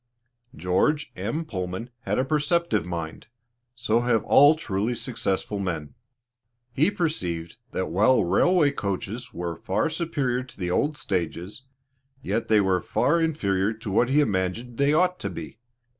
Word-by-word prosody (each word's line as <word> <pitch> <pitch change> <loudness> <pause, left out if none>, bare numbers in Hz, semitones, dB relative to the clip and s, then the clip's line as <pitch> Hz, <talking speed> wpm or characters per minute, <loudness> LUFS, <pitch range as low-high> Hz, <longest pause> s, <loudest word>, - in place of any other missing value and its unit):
George 95 - +1
M. 160 +2 -3
Pullman 95 0 -5
had 105 -3 -2
a 130 - +1
perceptive 155 - +1
mind 85 0 -5 0.5
so 115 -2 +1
have 120 -2 +1
all 145 +3 +6
truly 115 -5 -2
successful 105 -5 -2
men. 85 -6 -3 0.8
He 150 +8 +3
perceived 90 - -2
that 95 - -2
while 110 +9 +4
the - - +3
railway 165 - +3
coaches 110 +1 -4
were 85 -1 -4
far 95 - -1
superior 145 -7 -1
to 130 - -13
the 90 -2 -2
old 145 +10 +1
stages, 95 - -3 0.6
yet 115 - -1
they 110 -1 +5
were 95 -2 +1
far 170 +3 +1
inferior 105 -11 +1
to 110 -2 -7
what 120 +5 +3
he 145 +3 +4
imagined 110 +2 -2
they 140 +1 +4
ought 180 +4 +2
to 100 - -3
be. 85 +4 -8
115 Hz, 150 wpm, -25 LUFS, 95-145 Hz, 0.8 s, all